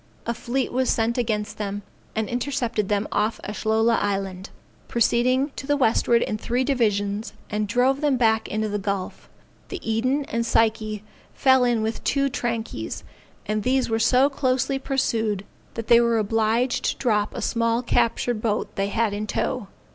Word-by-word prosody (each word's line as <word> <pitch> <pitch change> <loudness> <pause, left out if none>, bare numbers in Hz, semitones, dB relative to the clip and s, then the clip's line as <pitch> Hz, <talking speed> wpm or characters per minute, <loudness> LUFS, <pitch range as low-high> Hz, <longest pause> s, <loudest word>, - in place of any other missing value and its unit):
A 235 - -1
fleet 250 +3 -2
was 260 +1 +1
sent 230 +2 +1
against 215 -3 -2
them, 205 -1 -3 0.3
and 220 -1 -1
intercepted 245 -4 -1
them 205 0 0
off 215 +2 0
Ashlola 220 +2 +1
Island, 195 -2 -2 0.4
proceeding 255 +4 +2
to 270 - -6
the 290 0 +2
westward 235 -2 +3
in 215 - -3
three 245 +3 0
divisions; 210 -5 0 0.2
and 210 0 -1
drove 255 +6 +2
them 290 -3 +2
back 220 -2 +2
into 215 +1 -1
the 205 0 -2
gulf. 195 -1 -4 0.4
The 385 - -5
Eden 255 +6 +1
and 230 -3 -1
Psyche 220 -2 +1 0.3
fell 260 -1 +4
in 240 -3 +2
with 220 +1 -3
two 275 0 +1
trankies, 235 -4 -3 0.4
and 215 0 -1
these 255 +1 +1
were 225 - +1
so 250 +4 +4
closely 270 -1 0
pursued 225 -7 -1 0.3
that 230 - -4
they 235 +1 +6
were 235 -1 +2
obliged 225 +3 +1
to - - 0
drop 210 -4 0
a - - -4
small 230 +1 +1
captured 235 -1 +1
boat 215 -2 -1
they 195 0 +1
had 220 0 0
in 210 +1 -3
tow. 250 -3 -2
230 Hz, 165 wpm, -24 LUFS, 215-250 Hz, 0.4 s, they